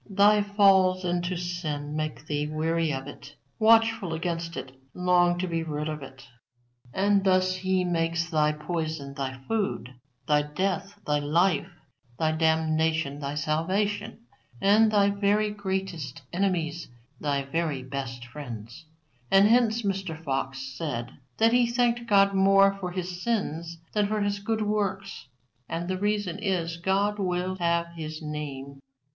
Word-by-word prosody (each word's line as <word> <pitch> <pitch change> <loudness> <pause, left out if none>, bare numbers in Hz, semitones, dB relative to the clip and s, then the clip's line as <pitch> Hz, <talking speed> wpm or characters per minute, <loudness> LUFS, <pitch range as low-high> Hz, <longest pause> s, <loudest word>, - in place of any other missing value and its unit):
Thy 205 +1 +5
falls 195 -3 +4
into 175 0 -1
sin 155 -5 -4
make 155 -1 -3
thee 150 -1 -1
weary 160 +1 0
of 135 -1 -4
it, 145 +1 -11 0.2
watchful 225 -5 +4
against 165 -1 -3
it, 130 0 -6 0.2
long 180 -1 +3
to 180 - -1
be 165 -2 -1
rid 150 -1 -3
of 155 -1 -4
it. 135 0 -12 0.6
And 200 +3 +2
thus 185 -1 +3
He 185 0 0
makes 165 -1 0
thy 155 -2 +2
poison 155 -2 -4
thy 135 -2 -4
food, 200 - -2 0.3
thy 150 -1 +4
death 195 +6 -3
thy 150 0 +1
life, 170 +3 +2 0.5
thy 160 -1 +1
damnation 160 -2 +1
thy 140 0 -4
salvation, 195 +9 -1 0.4
and 215 +3 +5
thy 200 -1 +4
very 205 +1 +1
greatest 190 -8 -4
enemies 170 -4 -1 0.3
thy 140 -2 0
very 145 -1 -2
best 130 -2 -5
friends. 120 0 -9 0.4
And 195 +1 +6
hence 230 0 +3
Mr. 190 -5 -2
Fox 135 -2 -2
said 125 -6 -4 0.3
that 225 +1 +4
he 245 -1 +4
thanked 240 0 +1
God 200 -2 +5
more 195 0 +5
for 180 -2 -3
his 180 0 -5
sins 170 -7 -2 0.2
than 210 -1 +2
for 215 0 -1
his 205 0 0
good 220 +1 -1
works. 200 -2 -2 0.4
And 170 +1 -3
the 185 0 -2
reason 205 -3 -1
is, 175 -5 -1
God 200 +4 0
will 185 0 -1
have 170 -1 +1
His 155 -1 -6
name." 140 -3 -6
175 Hz, 145 wpm, -27 LUFS, 150-200 Hz, 0.6 s, And